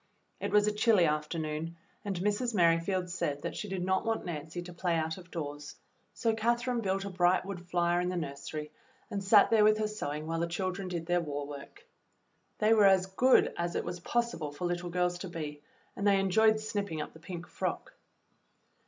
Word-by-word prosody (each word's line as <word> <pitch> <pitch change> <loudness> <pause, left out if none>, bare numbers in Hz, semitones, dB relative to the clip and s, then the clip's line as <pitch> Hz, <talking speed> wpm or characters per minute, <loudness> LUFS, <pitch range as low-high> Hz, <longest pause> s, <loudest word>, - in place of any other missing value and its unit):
It - - -2
was 210 0 +4
a 210 - +2
chilly 210 -3 +4
afternoon 155 +1 -2 0.3
and 195 -3 -3
Mrs. 210 +4 0
Merri 170 -3 +5
field 185 +1 -1
said 150 -5 -3
that - - -3
she 210 - -5
did 190 -2 -2
not 190 0 +1
want 225 -1 -1
Nancy 165 +1 -5
to 175 0 -9
play 175 0 0
out 160 +2 -1
of 180 -1 -14
doors, 145 -2 -6 0.4
so 230 -2 0
Catherine 235 +2 0
built 195 -1 -1
a 200 - -5
bright 185 0 +3
wood 195 -3 -5
fire 175 0 +2
in 180 - -1
the 185 - -2
nursery 150 -1 -5 0.4
and 200 -1 -2
sat 200 +2 +6
there 220 -2 +6
with 215 0 +5
her 215 0 0
sewing 155 -8 -4
while 165 +1 -2
the 170 - 0
chil 185 +2 -1
dren 190 +1 -6
did 170 -2 -4
their 175 +1 +2
war 145 -3 -4
work. 145 - -10 0.7
They 215 +1 +4
were 210 -3 +6
as 190 -1 +5
good 245 +7 +4
as 170 0 -2
it - - -1
was 175 0 -4
possible 235 -7 -1
for 145 +5 -5
little 175 0 -2
girls 180 0 0
to 190 - -5
be, 150 -3 -6 0.3
and 200 - -1
they 200 -1 +5
enjoyed 215 +3 +4
snipping 205 -6 -3
up 150 - -5
the 160 - -14
pink 170 +1 -7
frock. - - -4
180 Hz, 210 wpm, -31 LUFS, 165-205 Hz, 0.7 s, sat